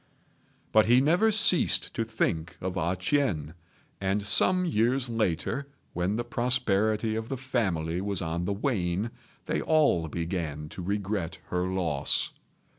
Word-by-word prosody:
But 110 Hz, -1 st, +5 dB
he 120 Hz, +2 st, +6 dB
never 175 Hz, +11 st, +3 dB
ceased 195 Hz, -5 st, +3 dB
to 115 Hz, -, -1 dB
think 95 Hz, -7 st, -2 dB
of 95 Hz, 0 st, -4 dB
A 90 Hz, 0 st, 0 dB
ch'ien; 90 Hz, -, 0 dB, 0.5 s
and 100 Hz, +1 st, 0 dB
some 185 Hz, -, +4 dB
years 125 Hz, -3 st, +1 dB
later, 115 Hz, -, -1 dB, 0.2 s
when 90 Hz, +4 st, -1 dB
the 120 Hz, -, -1 dB
prosperity 110 Hz, -3 st, +1 dB
of 110 Hz, +1 st, -4 dB
the 135 Hz, -, -3 dB
family 95 Hz, -10 st, -1 dB
was 100 Hz, -2 st, -2 dB
on 85 Hz, +1 st, -2 dB
the 100 Hz, -, -1 dB
wane, 100 Hz, -2 st, -1 dB, 0.3 s
they -, -, -1 dB
all 145 Hz, -, +2 dB
began 80 Hz, -3 st, -4 dB
to 90 Hz, -, -8 dB
regret 100 Hz, -2 st, -2 dB
her 90 Hz, 0 st, -1 dB
loss. 85 Hz, -7 st, 0 dB
100 Hz, 140 wpm, -28 LUFS, 90-120 Hz, 0.5 s, he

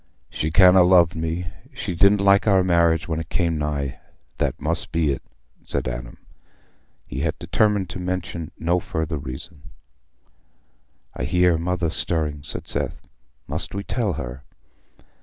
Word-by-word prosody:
"She 80 Hz, -, -2 dB
can't 90 Hz, +3 st, +7 dB
ha' -, -, +7 dB
loved 90 Hz, -1 st, +5 dB
me. 80 Hz, +2 st, -3 dB, 0.3 s
She -, -, -3 dB
didn't 100 Hz, +3 st, +4 dB
like 100 Hz, +2 st, +4 dB
our 95 Hz, -2 st, +5 dB
marriage 85 Hz, -3 st, +3 dB
when 80 Hz, -1 st, -1 dB
it 80 Hz, 0 st, -6 dB
came 85 Hz, -3 st, 0 dB
nigh—that 70 Hz, -3 st, -4 dB
must -, -, -1 dB
be 80 Hz, -2 st, +2 dB
it," 70 Hz, -, -3 dB, 0.4 s
said -, -, -2 dB
Adam. 60 Hz, -1 st, -6 dB, 0.9 s
He 60 Hz, -, -5 dB
had 80 Hz, +1 st, -1 dB
determined 105 Hz, -3 st, +1 dB
to 90 Hz, -, -6 dB
mention 90 Hz, -3 st, -3 dB
no 85 Hz, +2 st, +1 dB
further 80 Hz, -2 st, -3 dB
reason. 70 Hz, +3 st, -9 dB, 1.5 s
"I 65 Hz, -, -3 dB
hear 90 Hz, +3 st, +3 dB
Mother 85 Hz, -1 st, -1 dB
stirring," 80 Hz, -5 st, -1 dB
said -, -, -7 dB
Seth. -, -, -1 dB, 0.5 s
"Must -, -, -4 dB
we 100 Hz, -, -3 dB
tell 105 Hz, -3 st, -1 dB
her?" 65 Hz, -2 st, -6 dB
85 Hz, 145 wpm, -23 LUFS, 75-90 Hz, 1.5 s, can't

